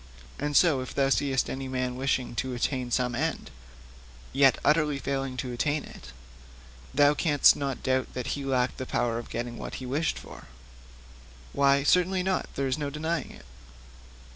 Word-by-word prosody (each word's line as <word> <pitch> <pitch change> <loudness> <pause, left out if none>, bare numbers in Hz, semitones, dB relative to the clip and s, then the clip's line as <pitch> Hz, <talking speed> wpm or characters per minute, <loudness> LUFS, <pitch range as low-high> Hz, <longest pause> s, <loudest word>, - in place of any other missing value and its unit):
And 145 0 +1
so, 155 -7 +4
if 130 - -7
thou 135 -1 +2
seest 135 -1 +1
any 135 0 -4
man 130 -1 -2
wishing 130 -2 -1
to 130 -1 -2
attain 125 0 -1
some 125 0 0
end, 120 - -2 0.8
yet 135 -1 +5
utterly 150 -1 +3
failing 135 -1 -3
to 125 0 -3
attain 145 +4 0
it, 65 - -12 0.8
thou 145 +1 +5
canst 150 -2 +5
not 140 -2 -4
doubt 130 -1 0
that 125 -2 -3
he 140 - -4
lacked 130 -2 0
the 130 - -5
power 120 -3 0
of 120 - -9
getting 120 0 -4
what - - -6
he 130 - -6
wished 145 +6 -1
for.' - - -11 1.1
'Why, 140 0 +3
certainly 180 +4 +3
not; 190 0 -1
there 140 - -1
is 135 +2 -1
no 145 -1 -2
denying 160 +3 -3
it.' - - -14
135 Hz, 170 wpm, -27 LUFS, 125-145 Hz, 1.1 s, yet